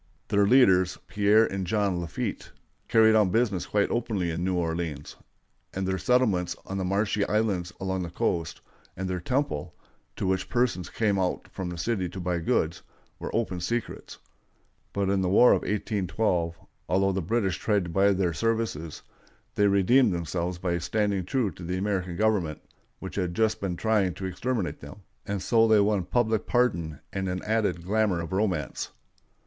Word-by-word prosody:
Their 100 0 +3
leaders, 95 -8 +5
Pierre 105 +2 +4
and 95 -3 -3
John 100 -4 0
Lafitte, 85 - -4 0.4
carried 110 -1 +5
on 105 -3 +4
business 105 -4 0
quite 105 -1 +1
openly 105 -7 -1
in 85 +2 -3
New 95 0 0
Orleans; 80 -4 -3 0.6
and 95 0 -2
their 95 0 -1
settlements 110 -9 +2
on 95 0 -4
the - - -1
marshy 100 +2 0
islands 100 -5 0
along 95 -1 -2
the 85 - -4
coast, 85 -2 -2 0.4
and 95 +1 -3
their 90 -1 -2
"temple," 125 - -2 0.4
to - - -3
which 95 0 0
persons 120 -8 0
came 105 -3 0
out 90 -1 -1
from 95 -2 -4
the 90 - -6
city 95 0 -1
to 95 - -8
buy 90 -1 -1
goods, 80 0 0 0.4
were - - -5
open 105 -6 -1
secrets. 115 +7 -4 0.7
But 100 -1 -1
in 100 -1 +1
the 90 - 0
War 115 +6 +6
of - - +3
1812, 95 -4 -1 0.3
although 95 +3 +2
the 95 0 -1
British 95 -1 0
tried 105 -3 +1
to 85 - -6
buy 100 +4 +4
their 90 -3 +1
services, 100 -4 -2 0.5
they 105 - +3
redeemed 100 +2 +4
themselves 85 +1 -3
by 90 -1 -1
standing 100 +1 0
true 115 0 0
to 85 - -11
the 90 +2 -2
American 95 -3 -2
government, 95 -7 +1 0.4
which - - -8
had 90 -3 -1
just 110 +1 +1
been 95 -3 -2
trying 100 -3 +1
to 95 - -6
exterminate 100 +2 -2
them, 90 +8 -11 0.2
and 100 -2 -2
so 115 -1 +4
they 110 -1 +5
won 100 -3 +2
public 110 +1 0
pardon 95 -11 0
and 95 -1 -2
an 90 0 -3
added 105 -6 0
glamour 105 -2 +1
of 85 +1 -5
romance. 95 -8 -1
95 Hz, 175 wpm, -27 LUFS, 90-110 Hz, 0.7 s, War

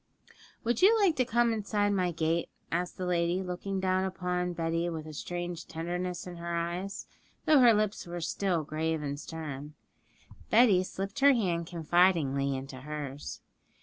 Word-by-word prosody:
'Would 235 0 0
you 440 +4 +6
like 380 -6 +4
to 255 - +3
come 235 0 +2
inside 205 -1 0
my 185 -3 +1
gate?' 165 +1 0 0.2
asked 175 +1 -2
the 185 - -3
lady, 175 +1 +1
looking 190 +2 -3
down 185 0 +1
upon 180 -1 -1
Betty 165 0 -1
with 160 -2 -5
a 155 - -8
strange 175 +2 -5
tenderness 175 +2 -3
in 180 -1 -8
her 170 0 -3
eyes, 175 +3 -3 0.4
though 305 -2 +6
her 245 -2 +8
lips 215 -3 0
were 175 0 -5
still 170 0 0
grave 155 +1 -2
and 145 0 -3
stern. 150 -2 -7 0.7
Betty 215 -5 +6
slipped 195 +2 -5
her 280 0 +7
hand 175 -8 0
confidingly 165 -5 +2
into 135 0 -7
hers. 145 -1 -6
175 Hz, 160 wpm, -30 LUFS, 160-195 Hz, 0.7 s, her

